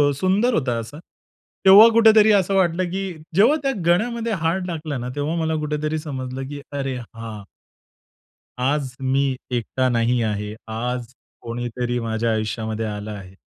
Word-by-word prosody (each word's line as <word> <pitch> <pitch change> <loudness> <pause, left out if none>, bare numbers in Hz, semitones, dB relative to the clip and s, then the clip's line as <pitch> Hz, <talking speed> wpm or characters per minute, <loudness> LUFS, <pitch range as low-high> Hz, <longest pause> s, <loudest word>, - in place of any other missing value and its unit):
सुंदर 195 - +2
होता 125 - 0
असा. 140 +7 -8 0.7
तेव्हा 200 +4 +10
कुठेतरी 220 -1 +6
असं 195 -1 +2
वाटलं 185 -1 +2
की 195 +1 -2 0.3
जेव्हा 230 +10 +5
त्या 270 - +1
गळ्यामध्ये 230 +6 +1
हार 165 +4 +1
टाकला 155 -4 -4
ना, 125 0 -4
तेव्हा 145 +3 -2
मला 160 0 0
कुठेतरी 150 +1 -2
समजलं 130 -3 -5
की 145 -1 -7
"अरे 135 -2 -3 0.2
हां" 110 -2 -7 1.2
"आज 135 -2 0
मी 135 +1 +1 0.3
एकटा 130 +2 -1
नाही 120 0 +1
आहे. 105 -1 -2
आज 120 +2 -4 0.3
कोणीतरी 120 +1 -3
माझ्या 115 0 -1
आयुष्यामध्ये 110 0 -2
आलं 105 0 -5
आहे." 95 -2 -10
135 Hz, 140 wpm, -22 LUFS, 115-175 Hz, 1.2 s, तेव्हा